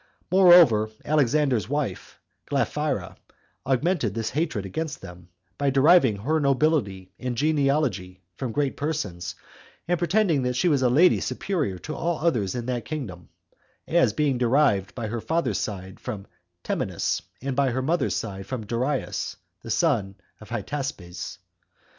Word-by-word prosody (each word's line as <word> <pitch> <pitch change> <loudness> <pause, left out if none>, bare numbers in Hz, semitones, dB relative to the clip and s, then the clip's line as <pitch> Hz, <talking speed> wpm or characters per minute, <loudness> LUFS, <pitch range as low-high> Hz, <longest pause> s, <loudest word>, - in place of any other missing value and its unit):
Moreover, 175 - +7 0.2
Alexander's 140 -6 +2
wife, 145 0 -3 0.3
Glaphyra, - - -1 0.5
augmented 135 - +1
this 110 -1 -2
hatred 145 - -1
against 150 - -4
them, 90 0 -11 0.3
by 140 - +2
deriving 135 - +5
her 145 +11 0
nobility 135 - +1
and 125 -2 -3
genealogy 135 -11 +1 0.2
[from 125 +3 -4
great 140 +3 0
persons], 95 - -3 0.5
and 175 -1 +1
pretending 175 -3 +2
that 125 0 -1
she 130 - +2
was 145 -4 +2
a 125 - +3
lady 165 +9 +5
superior 150 - -2
to 155 - -7
all 170 +1 -1
others 120 - 0
in 120 -1 -3
that 125 -1 -2
kingdom, 105 - -6 0.6
as 170 +1 +3
being 145 -5 0
derived 120 -6 +2
by 120 - -4
her 115 +1 -3
father's 135 - 0
side 95 -3 -5
from 105 -6 -6 0.4
Temenus, - - -1 0.2
and 135 0 -3
by 140 -1 +2
her 130 +1 -1
mother's 165 +5 +1
side 95 -3 -5
from 125 -5 -4
Darius, 125 +6 -2 0.2
the - - -9
son 110 - +1 0.2
of 110 - -13
Hystaspes. 120 -6 -5
130 Hz, 140 wpm, -25 LUFS, 105-155 Hz, 0.6 s, Moreover